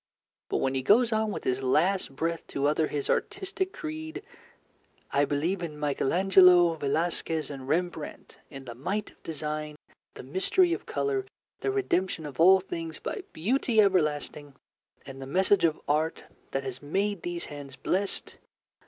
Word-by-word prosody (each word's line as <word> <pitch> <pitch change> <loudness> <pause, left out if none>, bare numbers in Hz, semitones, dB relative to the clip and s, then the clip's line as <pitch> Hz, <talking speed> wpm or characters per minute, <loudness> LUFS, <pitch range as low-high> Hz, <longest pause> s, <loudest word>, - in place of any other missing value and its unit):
But - - 0
when 135 - 0
he 135 - 0
goes 225 - +4
on 220 0 +1
with - - -5
his 130 +1 0
last 155 +4 +1
breath 165 +3 -2
to 140 - -2
utter 155 +1 +2
his 145 -2 -3
artistic 390 -2 -1
creed: 315 +4 -6 0.9
"I 145 +1 +3
believe 165 +7 -1
in 155 -3 -5
Michael 145 -2 0
Angelo, 180 -2 +6
Velasquez, 160 +1 -1
and 135 -2 -8
Rembrandt; 165 0 -3
in 135 -2 -9
the 120 - -7
might 195 - -3
of - - -28
design, 150 -1 -4 0.4
the - - -9
mystery 195 - +3
of - - -5
colour, 400 -2 -1 0.3
the - - -1
redemption 190 - 0
of 145 0 -8
all 190 +3 +8
things 165 -3 -6
by - - -4
Beauty 225 +6 +1
everlasting, 150 -7 +1 0.5
and 135 0 -9
the 135 - -6
message 190 +5 +3
of 160 -2 +1
Art 155 +3 0 0.3
that 135 - -2
has 130 -1 -6
made 195 +6 -1
these 175 -1 -4
hands 145 -2 -9
blessed. 195 +7 -2
165 Hz, 160 wpm, -28 LUFS, 145-200 Hz, 0.9 s, all